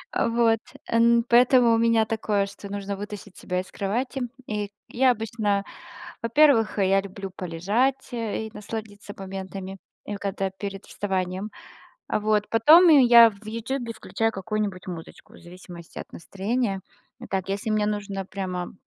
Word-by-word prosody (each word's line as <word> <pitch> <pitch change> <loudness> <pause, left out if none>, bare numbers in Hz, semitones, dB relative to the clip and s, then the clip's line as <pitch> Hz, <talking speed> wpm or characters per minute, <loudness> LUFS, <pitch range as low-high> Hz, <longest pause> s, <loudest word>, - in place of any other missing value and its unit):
А - - +2
вот. 230 -1 +3 0.3
Эн 235 0 +4
поэтому 245 0 +5
у - - +4
меня 230 -1 +3
такое, 215 -2 0
что 200 0 -10
нужно 200 0 -4
вытащить 205 -1 -8
себя 180 0 -3
из 185 - -14
кровати. 245 +7 -2 0.2
И 210 -2 -3 0.2
я 260 +2 +3
обычно, 215 -3 0 0.6
во-первых, 230 -2 +4
я 195 0 +3
люблю 195 0 -8
полежать 205 +11 -1
и 220 -2 -3
насладиться 210 -1 -8
моментами 190 0 -7 0.3
и 205 - -4
когда 195 -1 -3
перед 195 +1 -7
вставанием. 190 0 -3 0.6
А - - 0
вот. 210 0 +1
Потом 315 +11 +7
я 240 -6 +8
в 200 +1 -17
"Ютубе" 230 +2 -3
включаю 225 0 -2
какую-нибудь 205 -2 -3
музычку, 170 -3 -9
в - - -15
зависимости 175 -1 -12
от - - -8
настроения. 195 +3 -2 0.5
Так, 190 0 -2
если 200 +3 -2
мне 210 -1 +1
нужно 200 -2 -3
прямо 185 -2 -5
210 Hz, 145 wpm, -25 LUFS, 195-230 Hz, 0.6 s, я